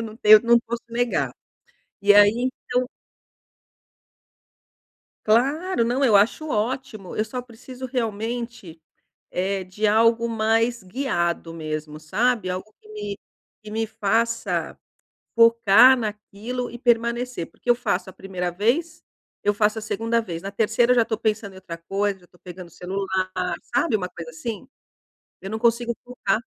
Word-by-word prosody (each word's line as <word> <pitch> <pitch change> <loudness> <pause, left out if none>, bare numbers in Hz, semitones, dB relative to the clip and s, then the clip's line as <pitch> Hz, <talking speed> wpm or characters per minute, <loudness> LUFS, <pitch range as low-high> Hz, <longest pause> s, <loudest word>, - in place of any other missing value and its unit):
Eu - - -3
não 220 -1 -8
tenho 215 -1 +8
não 235 0 +5
posso 235 0 -5
negar. 240 +1 0 0.7
E 205 +1 +6
aí 205 0 +7 0.4
então 250 0 0 2.4
Claro, 270 - +2
não, 255 +4 +1
eu 225 - +4
acho 235 +10 +2
ótimo. 220 -4 -3
Eu 215 - +1
só 250 +3 -5
preciso 250 +2 -11
realmente, 230 -6 -4 0.5
eh, 190 +1 -1
de 185 +4 -3
algo 230 +2 +3
mais 225 +1 +1
guiado 175 -6 -2
mesmo, 155 -1 -5
sabe, 210 +5 0
algo 185 +4 -5
que 215 - -19
me 205 -1 -6 0.5
que 210 - -9
me 225 +1 -1
faça 225 +2 -1 0.6
focar 230 +1 +7
naquilo 220 +3 -5
e 240 - -8
permanecer, 235 -3 0
porque 245 - -9
eu 240 - +6
faço 190 -6 -2
a - - -12
primeira 180 -2 -4
vez. 245 - 0 0.4
Eu 205 - +2
faço 210 +1 +1
a - - -9
segunda 225 +2 -1
vez. 170 -6 -6
Na 195 - -6
terceira 230 +4 +2
eu - - +5
já 230 - +6
estou 220 -1 -3
pensando 215 -3 -2
em - - -15
outra 175 -3 -8
coisa, 195 +3 -2
já 180 - -20
estou 175 - -25
pegando 180 -1 -9
o - - -20
celular, 185 -1 -2 0.2
sabe 240 - +2
uma 180 -3 -2
coisa 165 -1 -9
assim. 215 +9 -6 0.7
Eu 195 - -7
não 220 - -3
consigo 235 0 +1
focar. 235 -3 -1
220 Hz, 155 wpm, -23 LUFS, 190-235 Hz, 2.4 s, tenho